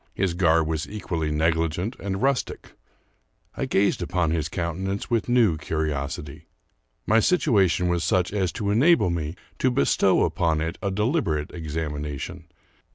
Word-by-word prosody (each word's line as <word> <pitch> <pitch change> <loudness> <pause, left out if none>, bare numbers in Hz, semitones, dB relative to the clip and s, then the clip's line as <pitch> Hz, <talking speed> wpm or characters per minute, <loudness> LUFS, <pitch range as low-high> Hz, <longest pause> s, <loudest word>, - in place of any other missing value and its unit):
His 95 -3 0
garb 85 -2 +3
was 80 -1 -3
equally 85 -6 -3
negligent 80 +7 0
and 95 +2 -3
rustic. 135 -1 -1 0.8
I - - -2
gazed 100 -1 +1
upon 90 -2 0
his 80 -1 -1
countenance 95 +5 -3
with 115 0 0
new 115 -10 +3
curiosity. 75 -2 -4 0.6
My 110 +1 +4
situation 100 - +2
was 85 -1 0
such 90 +1 +1
as 95 -4 0
to 100 -3 -2
enable 130 - +4
me 80 -1 -3 0.2
to 130 - +3
bestow 95 - +3
upon 80 -2 +1
it 80 +1 -3
a 100 - -1
deliberate 100 - 0
examination. 75 0 -5
85 Hz, 140 wpm, -24 LUFS, 80-100 Hz, 0.8 s, My